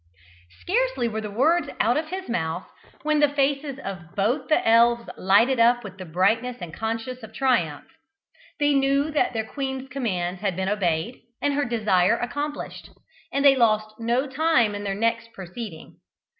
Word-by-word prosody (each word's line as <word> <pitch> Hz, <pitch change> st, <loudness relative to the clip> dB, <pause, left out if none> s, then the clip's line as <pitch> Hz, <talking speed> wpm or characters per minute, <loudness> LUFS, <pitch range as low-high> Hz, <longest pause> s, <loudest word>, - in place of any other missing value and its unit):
Scarcely -, -, 0 dB
were 220 Hz, -1 st, -3 dB
the 210 Hz, -, -5 dB
words 295 Hz, +9 st, +2 dB
out 240 Hz, +2 st, +3 dB
of 310 Hz, +1 st, -1 dB
his 375 Hz, +3 st, -6 dB
mouth 175 Hz, -6 st, -2 dB, 0.4 s
when 305 Hz, 0 st, +2 dB
the 295 Hz, -1 st, +5 dB
faces 280 Hz, 0 st, 0 dB
of 175 Hz, -8 st, -8 dB
both 245 Hz, +7 st, 0 dB
the 310 Hz, -, +2 dB
elves 235 Hz, +1 st, +4 dB
lighted 230 Hz, +7 st, +3 dB
up 240 Hz, +1 st, +4 dB
with 195 Hz, -2 st, -10 dB
the 185 Hz, -, -6 dB
brightness 225 Hz, +9 st, +1 dB
of 175 Hz, -3 st, -7 dB
conscious 225 Hz, +4 st, -4 dB, 0.2 s
triumph; 185 Hz, -, +1 dB, 0.7 s
they 290 Hz, 0 st, +3 dB
knew 275 Hz, +2 st, +2 dB
that 295 Hz, -4 st, +1 dB
their 220 Hz, -1 st, -2 dB
queen's 265 Hz, +1 st, -5 dB
commands 190 Hz, -9 st, -2 dB
had 195 Hz, -4 st, -1 dB
been 190 Hz, +1 st, -1 dB
obeyed, 185 Hz, +1 st, -1 dB, 0.2 s
and 285 Hz, -, 0 dB
her 290 Hz, 0 st, 0 dB
desire 215 Hz, -3 st, +2 dB
accomplished, 290 Hz, +4 st, -5 dB, 0.4 s
and 280 Hz, +1 st, 0 dB
they 275 Hz, -1 st, +8 dB
lost 215 Hz, -3 st, +1 dB
no 235 Hz, +4 st, +1 dB
time 270 Hz, -6 st, +2 dB
in 205 Hz, 0 st, -5 dB
their 195 Hz, -1 st, -2 dB
next 230 Hz, +2 st, -1 dB
proceeding. 190 Hz, -1 st, -9 dB
235 Hz, 165 wpm, -24 LUFS, 205-275 Hz, 0.7 s, they